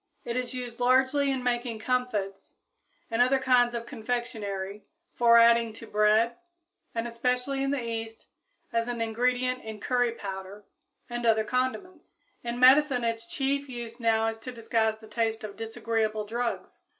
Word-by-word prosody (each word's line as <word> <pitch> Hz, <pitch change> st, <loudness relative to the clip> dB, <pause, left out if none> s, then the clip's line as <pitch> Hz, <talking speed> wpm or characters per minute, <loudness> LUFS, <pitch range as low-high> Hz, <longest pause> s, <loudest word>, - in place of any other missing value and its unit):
It 235 Hz, -, -3 dB
is 255 Hz, 0 st, -3 dB
used 245 Hz, -2 st, -6 dB
largely 260 Hz, +3 st, +3 dB
in 265 Hz, -2 st, -1 dB
making 240 Hz, -2 st, -1 dB
comfits 220 Hz, -5 st, -2 dB, 0.6 s
and 225 Hz, +1 st, +2 dB
other 255 Hz, +2 st, +4 dB
kinds 250 Hz, -2 st, +3 dB
of 235 Hz, 0 st, -4 dB
confectionery, 210 Hz, -5 st, -4 dB, 0.3 s
for 235 Hz, -1 st, +5 dB
adding 230 Hz, -1 st, +5 dB
to 225 Hz, -, -10 dB
bread, 215 Hz, +2 st, +3 dB, 0.6 s
and, 230 Hz, +1 st, -1 dB
especially 250 Hz, +3 st, -1 dB
in 275 Hz, -, 0 dB
the 275 Hz, -3 st, -1 dB
East, 225 Hz, -1 st, -5 dB, 0.5 s
as 230 Hz, 0 st, +1 dB
an 240 Hz, -1 st, -3 dB
ingredient 250 Hz, +3 st, 0 dB
in 220 Hz, -1 st, -7 dB
curry 245 Hz, +1 st, +1 dB
powder 195 Hz, -1 st, -7 dB, 0.4 s
and 240 Hz, 0 st, -4 dB
other 220 Hz, -2 st, +3 dB
condiments. 255 Hz, -, -3 dB, 0.3 s
In 240 Hz, 0 st, -3 dB
medicine 260 Hz, 0 st, +6 dB
its 230 Hz, 0 st, -2 dB
chief 280 Hz, 0 st, -1 dB
use 240 Hz, -1 st, -7 dB
now 225 Hz, -1 st, +2 dB
is 225 Hz, 0 st, -2 dB
to 255 Hz, +3 st, -7 dB
disguise 225 Hz, -2 st, 0 dB
the 220 Hz, 0 st, -14 dB
taste 225 Hz, 0 st, -1 dB
of 205 Hz, -2 st, -7 dB
disagreeable 220 Hz, -1 st, -2 dB
drugs. 235 Hz, +3 st, -3 dB
235 Hz, 155 wpm, -28 LUFS, 225-250 Hz, 0.6 s, medicine